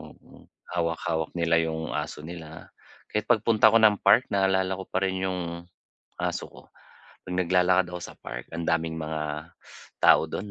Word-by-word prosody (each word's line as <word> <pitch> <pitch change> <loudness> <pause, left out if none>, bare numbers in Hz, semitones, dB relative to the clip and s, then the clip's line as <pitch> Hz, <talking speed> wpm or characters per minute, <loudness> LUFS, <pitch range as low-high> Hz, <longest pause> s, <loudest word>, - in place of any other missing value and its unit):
mm. - - -16 0.2
Hawak-hawak 85 -2 -2
nila 85 -1 +2
yung 80 0 -4
aso 75 0 -4
nila. 80 -1 -10 0.4
Kahit 105 - -2
pagpunta 110 -2 +4
ko 115 - +6
ng 105 -2 +6
park, 130 +3 +4
naalala 95 -1 +1
ko 95 - -7
pa 95 - -2
rin 95 -1 0
yung 90 -1 -2 0.8
aso - - -3
ko. - - -15 0.6
'Pag 90 - -6
naglalakad 90 +1 +3
ako 90 - -5
sa - - -9
park, - - -8
ang 85 0 -5
daming 80 -1 0
mga 75 +1 -4 0.5
tao - - +6
doon 100 +6 -6
85 Hz, 160 wpm, -26 LUFS, 80-95 Hz, 0.8 s, ko